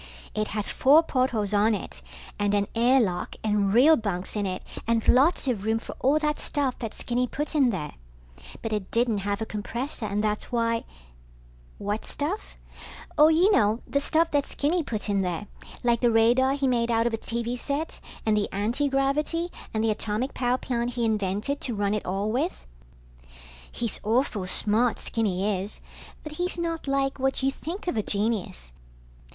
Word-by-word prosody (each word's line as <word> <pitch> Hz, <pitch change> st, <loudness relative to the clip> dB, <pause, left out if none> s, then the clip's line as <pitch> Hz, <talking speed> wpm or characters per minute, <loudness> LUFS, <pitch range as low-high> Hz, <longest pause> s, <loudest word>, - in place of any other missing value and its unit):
It 215 Hz, 0 st, -1 dB
had 210 Hz, -2 st, -3 dB
four 295 Hz, +5 st, +5 dB
portholes 245 Hz, -8 st, 0 dB
on 210 Hz, +2 st, +4 dB
it -, -, -7 dB, 0.4 s
and 205 Hz, 0 st, +2 dB
an 200 Hz, 0 st, +1 dB
air 245 Hz, +3 st, +4 dB
lock 180 Hz, -7 st, -1 dB
and 210 Hz, -2 st, +2 dB
real 270 Hz, +9 st, +7 dB
bunks 195 Hz, -6 st, -3 dB
in 205 Hz, -2 st, 0 dB
it 185 Hz, 0 st, -4 dB, 0.2 s
and 230 Hz, -1 st, +1 dB
lots 275 Hz, +4 st, +4 dB
of 225 Hz, -6 st, 0 dB
room 220 Hz, +1 st, +1 dB
for 225 Hz, -, -8 dB
all 275 Hz, +4 st, +3 dB
that 300 Hz, -1 st, 0 dB
stuff 280 Hz, -4 st, -2 dB
that 225 Hz, -3 st, -5 dB
Skinny 250 Hz, +1 st, -1 dB
put 295 Hz, +5 st, -4 dB
in 280 Hz, -5 st, +4 dB
there. 165 Hz, -9 st, -3 dB, 0.7 s
But 225 Hz, -, -2 dB
it 205 Hz, -3 st, -3 dB
didn't 230 Hz, -3 st, +1 dB
have 200 Hz, +2 st, -2 dB
a -, -, -4 dB
compressor 230 Hz, +4 st, -4 dB
and 205 Hz, +1 st, -1 dB
that's 210 Hz, +2 st, -2 dB
why... 230 Hz, -1 st, 0 dB, 0.9 s
What 205 Hz, +2 st, -3 dB
stuff? 330 Hz, +9 st, -4 dB, 0.6 s
Oh, 300 Hz, -, +7 dB
you 335 Hz, +6 st, +4 dB
know, 215 Hz, -, +3 dB
the 280 Hz, -, 0 dB
stuff 325 Hz, +3 st, +2 dB
that 285 Hz, -1 st, +1 dB
Skinny 330 Hz, +5 st, 0 dB
put 220 Hz, -9 st, -3 dB
in 200 Hz, -1 st, +1 dB
there. 180 Hz, +1 st, -2 dB, 0.4 s
Like 235 Hz, -1 st, +2 dB
the 240 Hz, -, +4 dB
radar 240 Hz, +4 st, +4 dB
he 275 Hz, -1 st, 0 dB
made 240 Hz, -2 st, +1 dB
out 230 Hz, 0 st, +2 dB
of 235 Hz, -, 0 dB
a -, -, 0 dB
TV 235 Hz, +1 st, -3 dB
set 285 Hz, +5 st, -3 dB, 0.3 s
and 220 Hz, -1 st, +3 dB
the 210 Hz, -1 st, 0 dB
antigravity 275 Hz, -, 0 dB, 0.2 s
and 220 Hz, 0 st, -1 dB
the 225 Hz, -, +3 dB
atomic 215 Hz, +4 st, -2 dB
power 250 Hz, 0 st, +1 dB
plant 245 Hz, -2 st, -2 dB
he 235 Hz, -1 st, 0 dB
invented 215 Hz, +5 st, -1 dB
to 240 Hz, -, -2 dB
run 205 Hz, 0 st, 0 dB
it 210 Hz, -, -3 dB
all 195 Hz, +3 st, -1 dB
with. 285 Hz, +10 st, -2 dB, 1.1 s
He's 235 Hz, -3 st, -3 dB
awful 220 Hz, -4 st, 0 dB
smart, 220 Hz, +5 st, +2 dB
Skinny 200 Hz, -3 st, -1 dB
is, 205 Hz, -, -9 dB, 0.4 s
but 305 Hz, -, -7 dB
he's 355 Hz, 0 st, -1 dB
not 330 Hz, -3 st, -3 dB
like 275 Hz, 0 st, 0 dB
what 265 Hz, 0 st, 0 dB
you 270 Hz, -, +3 dB
think 340 Hz, +8 st, -6 dB
of 350 Hz, -, 0 dB
a 215 Hz, -, +1 dB
genius. 200 Hz, -, -2 dB
235 Hz, 180 wpm, -26 LUFS, 210-275 Hz, 1.1 s, real